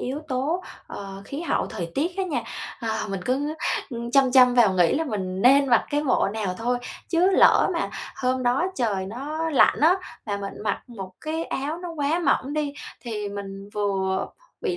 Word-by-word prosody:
yếu 270 Hz, +4 st, -3 dB
tố, 285 Hz, +8 st, -1 dB, 0.2 s
ờ, 195 Hz, -1 st, -8 dB
khí 280 Hz, +3 st, -6 dB
hậu 340 Hz, -, 0 dB
thời 170 Hz, -1 st, -5 dB
tiết 345 Hz, +6 st, -1 dB
á 385 Hz, -, 0 dB
nha. 280 Hz, -10 st, -2 dB, 0.4 s
Ờ, 220 Hz, -1 st, -2 dB
mình 195 Hz, -1 st, -3 dB
cứ, 285 Hz, +4 st, 0 dB, 0.4 s
ừm, 235 Hz, 0 st, -5 dB
chăm 270 Hz, -1 st, +4 dB
chăm 250 Hz, -1 st, +7 dB
vào 225 Hz, -6 st, +5 dB
nghĩ 175 Hz, -2 st, +4 dB
là 320 Hz, +3 st, 0 dB
mình 190 Hz, -6 st, -3 dB
nên 275 Hz, +2 st, +6 dB
mặc 235 Hz, -, +4 dB
cái 290 Hz, +1 st, +1 dB
bộ 255 Hz, -7 st, +2 dB
nào 210 Hz, -4 st, -2 dB
thôi. 245 Hz, +2 st, 0 dB, 0.3 s
Chứ 355 Hz, +3 st, +3 dB
lỡ -, -, +5 dB
mà -, -, -1 dB, 0.3 s
hôm 255 Hz, 0 st, 0 dB
đó 245 Hz, +6 st, +2 dB
trời 200 Hz, -7 st, -1 dB
nó 300 Hz, +9 st, -3 dB
lạnh 285 Hz, -, +4 dB
á, 325 Hz, +4 st, +6 dB, 0.3 s
mà 205 Hz, -2 st, -1 dB
mình 200 Hz, 0 st, -6 dB
mặc 205 Hz, -2 st, -1 dB
một 195 Hz, -6 st, -8 dB
cái 320 Hz, +2 st, -3 dB
áo 295 Hz, +5 st, -3 dB
nó 350 Hz, -1 st, -6 dB
quá 300 Hz, +2 st, 0 dB
mỏng 280 Hz, -3 st, +1 dB
đi, 300 Hz, -2 st, -1 dB, 0.3 s
thì 215 Hz, -4 st, -4 dB
mình 200 Hz, 0 st, -7 dB
vừa 195 Hz, -2 st, 0 dB, 0.3 s
bị 395 Hz, -6 st, -1 dB
250 Hz, 195 wpm, -25 LUFS, 205-295 Hz, 0.4 s, chăm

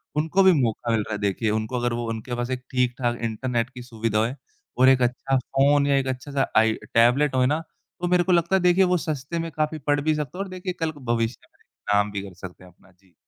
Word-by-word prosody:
उनको 160 Hz, +6 st, +2 dB
भी 190 Hz, -, +7 dB
मौका 115 Hz, 0 st, -1 dB
मिल 115 Hz, -, +2 dB
रहा 105 Hz, -, -5 dB
है -, -, -2 dB
देखिए, 100 Hz, +2 st, 0 dB
उनको 110 Hz, +3 st, -2 dB
अगर 120 Hz, 0 st, -1 dB
वो 120 Hz, 0 st, -3 dB
उनके 115 Hz, +2 st, -4 dB
पास 120 Hz, +1 st, -3 dB
एक 130 Hz, 0 st, -3 dB
ठीक-ठाक 125 Hz, -1 st, 0 dB
इंटरनेट 115 Hz, +1 st, -1 dB
की 125 Hz, -, -10 dB
सुविधा 115 Hz, -3 st, -2 dB
होए 115 Hz, +5 st, 0 dB, 0.4 s
और 130 Hz, +1 st, +6 dB
एक 130 Hz, -1 st, +4 dB
अच्छा 125 Hz, +2 st, +1 dB
फ़ोन 140 Hz, +3 st, +2 dB
या 140 Hz, -, +3 dB
एक 135 Hz, -, 0 dB
अच्छा-सा 135 Hz, +1 st, -2 dB
आई 110 Hz, 0 st, +5 dB, 0.2 s
टैबलेट 130 Hz, +5 st, +4 dB
होए 130 Hz, -1 st, +3 dB
ना, 150 Hz, +4 st, +1 dB, 0.4 s
तो 175 Hz, -, 0 dB
मेरे 180 Hz, 0 st, +3 dB
को 185 Hz, -, 0 dB
लगता 170 Hz, +1 st, +3 dB
है 190 Hz, -, +2 dB
देखिए 180 Hz, +1 st, +4 dB
वो 180 Hz, -1 st, +2 dB
सस्ते 155 Hz, +1 st, -4 dB
में 165 Hz, 0 st, -4 dB
काफ़ी 155 Hz, +1 st, -2 dB
पढ़ 145 Hz, 0 st, +2 dB
भी 155 Hz, +1 st, +1 dB
सकते 150 Hz, +2 st, -5 dB
हो 195 Hz, -, -1 dB
और 195 Hz, -, -9 dB
देखिए 185 Hz, 0 st, -5 dB
कल 165 Hz, -1 st, -1 dB
को 150 Hz, -, -15 dB, 0.2 s
भविष्य 115 Hz, +1 st, -3 dB
में -, -, -31 dB, 0.3 s
काम 105 Hz, 0 st, +2 dB
भी 100 Hz, -1 st, -4 dB
कर 100 Hz, -2 st, -10 dB
सकते 90 Hz, 0 st, -11 dB
हैं, 90 Hz, -, -15 dB
अपना। 90 Hz, -, -25 dB
जी। 90 Hz, 0 st, -30 dB
130 Hz, 255 wpm, -24 LUFS, 115-155 Hz, 0.4 s, भी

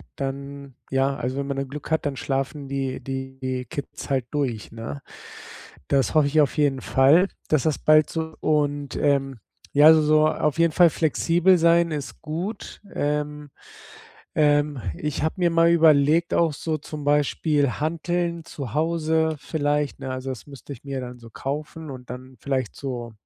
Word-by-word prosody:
dann 140 Hz, 0 st, -6 dB, 0.2 s
ja, 135 Hz, +1 st, +1 dB
also, 130 Hz, 0 st, -3 dB
wenn 140 Hz, 0 st, -2 dB
man 140 Hz, -1 st, -3 dB
dann 135 Hz, -, -2 dB
Glück 145 Hz, +2 st, -8 dB
hat, 160 Hz, 0 st, 0 dB
dann 145 Hz, -2 st, -1 dB
schlafen 135 Hz, +2 st, -3 dB
die 135 Hz, -1 st, -3 dB
die 130 Hz, -1 st, -4 dB
Kids 140 Hz, 0 st, -7 dB
halt 130 Hz, -3 st, 0 dB
durch, 130 Hz, -8 st, -2 dB
ne? 90 Hz, -12 st, -7 dB, 0.9 s
Das 135 Hz, -5 st, +2 dB
hoffe 155 Hz, -2 st, +5 dB
ich 155 Hz, +2 st, +3 dB
auf 145 Hz, +1 st, 0 dB
jeden 140 Hz, -3 st, +2 dB
Fall, 145 Hz, +11 st, +4 dB, 0.2 s
dass 155 Hz, -4 st, +2 dB
das 155 Hz, -3 st, 0 dB
bald 155 Hz, 0 st, +5 dB
so 160 Hz, -1 st, -4 dB
und, 145 Hz, -3 st, 0 dB
ähm, 135 Hz, -3 st, +1 dB, 0.3 s
ja 150 Hz, +2 st, +8 dB
so 155 Hz, 0 st, +4 dB
auf 150 Hz, 0 st, 0 dB
jeden 170 Hz, -1 st, +4 dB
Fall 175 Hz, -2 st, +6 dB
flexibel 170 Hz, +4 st, +2 dB
sein 170 Hz, 0 st, +4 dB
ist 140 Hz, -7 st, -5 dB
gut, 170 Hz, +8 st, -5 dB
ähm, 150 Hz, 0 st, -2 dB, 0.9 s
ähm, 145 Hz, -2 st, +2 dB, 0.2 s
ich 150 Hz, -1 st, -3 dB
habe 160 Hz, -, -1 dB
mir 175 Hz, -1 st, +3 dB
mal 165 Hz, 0 st, +4 dB
überlegt 160 Hz, 0 st, +4 dB
auch 165 Hz, -2 st, +3 dB
so 155 Hz, +2 st, -3 dB
zum 150 Hz, 0 st, -8 dB
Beispiel 145 Hz, -1 st, +2 dB
Hanteln 170 Hz, +2 st, -1 dB
zu 135 Hz, -8 st, -7 dB
Hause 160 Hz, 0 st, +1 dB
vielleicht, 145 Hz, -1 st, -1 dB
ne? 130 Hz, -, -5 dB
Also, 130 Hz, +1 st, -4 dB
das 130 Hz, +1 st, -7 dB
müsste 140 Hz, 0 st, -10 dB
ich 120 Hz, -, -16 dB
mir 135 Hz, -1 st, -4 dB
dann 125 Hz, 0 st, -8 dB
so 115 Hz, -1 st, -13 dB
kaufen 150 Hz, +5 st, -5 dB
und 125 Hz, -2 st, -10 dB
dann 130 Hz, +1 st, -9 dB
vielleicht 130 Hz, -5 st, -2 dB
so 120 Hz, -4 st, -5 dB
145 Hz, 170 wpm, -24 LUFS, 135-155 Hz, 0.9 s, ja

